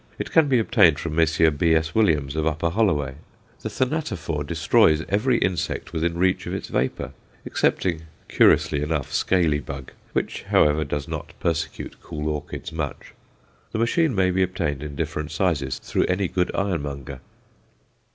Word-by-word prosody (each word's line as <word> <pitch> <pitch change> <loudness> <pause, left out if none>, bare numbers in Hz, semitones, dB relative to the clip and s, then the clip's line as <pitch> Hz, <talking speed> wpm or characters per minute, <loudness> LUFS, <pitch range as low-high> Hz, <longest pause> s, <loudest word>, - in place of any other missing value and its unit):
It - - -5
can 160 -2 +5
be 130 -2 +3
obtained 100 -9 +4
from 80 0 -4
Messrs. 80 0 +3
B.S. 80 +1 +2
Williams, 75 -10 +2
of 80 0 0
Upper 80 +2 0
Holloway. 75 -10 +1 0.4
The - - -4
Thanatophore 105 - -2
destroys 80 0 +3
every 115 +5 +2
insect 90 -4 -2
within 85 +1 -1
reach 95 +1 +1
of - - -3
its - - -6
vapour, 65 - -2 0.3
excepting, 80 -3 0 0.2
curiously 70 - +4
enough, 75 -2 -2
scaly 85 -6 +2
bug, 70 -2 -8 0.2
which, - - -2
however, 75 +1 +4
does 75 0 -4
not - - -6
persecute 85 -3 -3
cool 75 -2 -4
orchids 75 -1 -5
much. 80 -3 -5 0.6
The - - -1
machine 130 +5 +2
may 95 -1 +3
be 95 +1 +1
obtained 85 -7 -1
in 75 -1 -6
different 75 +2 -3
sizes 75 -5 0
through - - -1
any 95 +1 0
good 90 +1 0
ironmonger. 70 -8 -3
80 Hz, 150 wpm, -24 LUFS, 75-95 Hz, 0.6 s, can